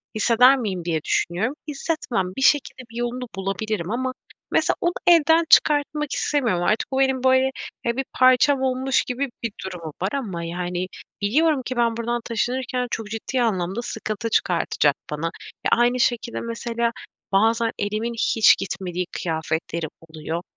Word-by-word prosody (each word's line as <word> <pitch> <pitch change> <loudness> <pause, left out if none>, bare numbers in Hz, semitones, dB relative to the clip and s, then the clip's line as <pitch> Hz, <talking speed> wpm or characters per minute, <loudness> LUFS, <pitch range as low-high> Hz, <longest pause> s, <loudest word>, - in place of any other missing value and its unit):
hisseder 245 +5 +5
miyim?" 190 -8 -3
diye 160 -3 -1
düşünüyorum. 200 +10 0
Hissetmem. 285 - -2
Bir - - -2
şekilde, 270 -1 +3
bir - - -13
yolunu 240 +1 -3
bulabilirim 195 0 -3
ama 255 +2 -1 0.4
mesela - - +2
onu 345 - +1
elden 330 -1 +6
çıkartmak 300 -1 +4
istemiyorum 235 -12 0
artık. 215 +6 0
Bu, 265 - 0
benim 265 -1 +2
böyle, 260 0 +4 0.3
ya, 235 +1 0
bir 270 - -1
parçam 255 +2 +4
olmuş 260 0 +1
gibi 260 +2 -3
bir 230 - -1
durumu 170 -5 -6
var 190 - +1
ama, 200 -12 -3
yani, 175 +1 -3 0.3
biliyorum 290 +8 +2
ki 255 - -3
ben 230 -1 +2
buradan 235 +1 -2
taşınırken 250 +2 -1
çok 220 -1 -3
ciddi 225 +4 -2
anlamda 195 -2 0
sıkıntı 225 -1 -4
çıkartacak 170 -7 +2 0.2
bana 150 +2 -2 0.4
ve - - +3
aynı 240 +1 +3
şekilde, 235 -1 0
mesela, 235 0 -2 0.4
bazen 225 +3 +3
elimin 215 +3 -2
hiç 225 -1 +4
gitmediği 180 -2 -3
kıyafetlerim 160 0 -3 0.2
oluyor. 160 +1 -4
235 Hz, 150 wpm, -23 LUFS, 190-260 Hz, 0.4 s, elden